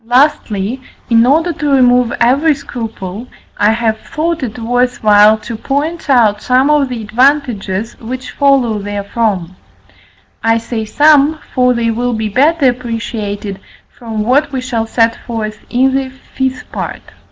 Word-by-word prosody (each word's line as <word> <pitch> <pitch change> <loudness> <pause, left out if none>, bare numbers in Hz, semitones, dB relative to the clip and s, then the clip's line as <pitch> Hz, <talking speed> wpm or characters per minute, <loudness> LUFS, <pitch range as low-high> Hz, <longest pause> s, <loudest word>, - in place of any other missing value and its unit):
Lastly, 245 -3 +1 0.3
in 230 +1 +5
order 325 +5 +2
to 295 -1 -3
remove 250 -3 +3
every 285 +6 +3
scruple, 225 -4 -7 0.3
I 205 - +2
have 225 -1 0
thought 325 +3 -3
it 245 -3 -5
worth 245 +1 -1
while 210 0 +6
to 220 +1 -7
point 290 +7 -3
out 220 -6 +3
some 260 +3 +2
of 290 -3 +2
the 240 -3 -5
advantages, 230 -4 0
which 255 +3 -6
follow 265 -6 +2
therefrom. 200 -2 -2 0.9
I 225 0 +3
say 230 -1 -4
"some," 295 +5 +4 0.2
for 250 -1 +3
they 230 -1 0
will 245 +2 -1
be 220 -1 -2
better 285 +6 +3
appreciated 225 -5 -3 0.4
from 225 -3 -4
what 280 +6 +2
we 265 - -2
shall 240 -3 -2
set 230 0 +2
forth 215 -2 -4
in 260 +2 +2
the 270 -1 -1
fifth 265 0 -5
part. - - -5
245 Hz, 145 wpm, -14 LUFS, 220-270 Hz, 0.9 s, while